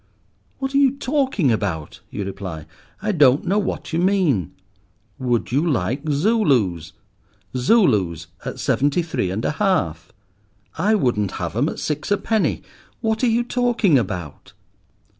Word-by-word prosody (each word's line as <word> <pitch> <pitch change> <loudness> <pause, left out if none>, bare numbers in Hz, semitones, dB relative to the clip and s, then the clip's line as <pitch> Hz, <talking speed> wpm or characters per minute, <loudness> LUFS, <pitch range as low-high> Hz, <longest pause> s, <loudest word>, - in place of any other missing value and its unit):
"What 270 0 -3
are 275 - +4
you 275 -1 +4
talking 260 - +1
about?" 95 -8 -2
you 100 - -4
reply; 95 -5 -6 0.4
"I 210 - +1
don't 145 -7 +4
know 200 +3 +2
what 195 -4 -4
you 165 - +1
mean." 175 - +2 0.7
"Would 120 -3 -1
you 140 +5 +2
like 135 - -1
Zulus—Zulus 125 - 0 0.2
at - - -6
seventy 145 +5 +1
three 160 - -2
and 100 +5 -3
a - - +1
half?" 90 - 0 0.6
"I 215 +3 +2
wouldn't 105 - 0
have 90 0 -4
'em 140 +7 +1
at - - -6
six 150 -1 -3
a 205 - +3
penny. 220 0 0 0.4
What 220 +1 -1
are - - +5
you 235 +1 +2
talking 240 - +2
about?" 90 - -6
145 Hz, 140 wpm, -21 LUFS, -, 0.7 s, are